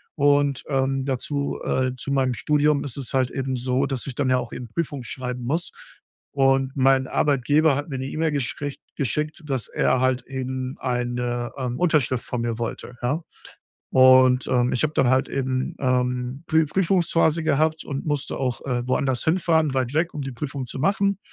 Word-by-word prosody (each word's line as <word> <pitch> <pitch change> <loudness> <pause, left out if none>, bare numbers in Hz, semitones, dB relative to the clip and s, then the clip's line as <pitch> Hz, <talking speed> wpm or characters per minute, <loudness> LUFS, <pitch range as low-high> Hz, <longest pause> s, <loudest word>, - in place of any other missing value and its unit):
und, 145 -2 +2
ähm, 135 -1 0
dazu, 140 +2 -2
äh, 130 0 +1
zu 140 +3 -5
meinem 130 -2 +2
Studium 150 +2 +2
ist 135 -2 -6
es 135 -3 -4
halt 130 -1 +2
eben 135 -1 -2
so, 130 +2 0
dass 130 -3 -3
ich 135 - -4
dann 140 -3 0
ja 130 - +4
auch 120 -1 -4
eben 120 - -6
Prüfungen 145 -1 -3
schreiben 125 +1 -5
muss 160 +8 -1 0.6
und 135 -1 +3
mein 135 -1 +3
Arbeitgeber 145 +2 +2
hat 145 - -4
mir 135 - -3
'ne 130 - -3
E-Mail 155 +2 -1
geschrich 140 +1 -3 0.2
geschickt, 150 +4 -2
dass 135 -5 -2
er 130 - +1
halt 130 -1 +1
eben 130 0 -4
eine, 120 -1 -2
ähm, 125 -2 -3
Unterschrift 150 -8 +2
von 125 - -3
mir 115 -1 -2
wollte, 120 +1 -5
ja? 145 +7 0 0.7
Und, 130 0 +6
ähm, 125 -1 +2
ich 125 - 0
habe 155 0 +1
dann 125 - +3
halt 130 0 +3
eben, 130 -1 -2
ähm, 125 +1 -1
Prü 160 0 +3
Prüfungsphase 165 -2 +2
gehabt 155 +1 +1
und 140 +1 -4
musste 145 -2 -2
auch, 125 -3 -2
äh, 125 -2 -1
woanders 130 -1 0
hinfahren, 160 -3 +2
weit 130 0 0
weg, 165 +3 +1
um 150 - -4
die 135 -1 -4
Prüfung 135 +1 -4
zu 130 - -6
machen 200 +4 +1
135 Hz, 185 wpm, -24 LUFS, 125-145 Hz, 0.7 s, Und